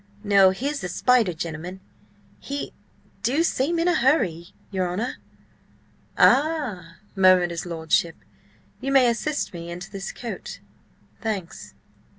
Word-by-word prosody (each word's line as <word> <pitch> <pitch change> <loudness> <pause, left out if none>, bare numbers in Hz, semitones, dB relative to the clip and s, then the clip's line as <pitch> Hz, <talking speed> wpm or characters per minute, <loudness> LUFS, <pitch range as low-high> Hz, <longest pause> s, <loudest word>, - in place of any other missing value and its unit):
No, 200 -2 +6
here's 275 +10 -2
the 180 - -4
spider 235 +1 +3
gentleman! 170 +2 -6 0.6
He 280 +1 -5 0.5
do 280 +7 +2
seem 330 +1 0
in 335 +1 +1
a 355 - +4
hurry, 205 - +1 0.2
your 185 -2 -1
honour!" 220 +8 -3 1.0
"Ah!" 250 - +2 0.2
murmured 185 -2 +5
his 170 +1 -5
lordship. 165 0 0 0.6
"You 275 - -3
may 265 -2 +6
assist 285 +3 -2
me 170 -1 -7
into 175 +2 -7
this 195 0 -5
coat. 235 - -7 0.6
Thanks." 200 -7 -5
195 Hz, 125 wpm, -24 LUFS, 175-270 Hz, 1.0 s, No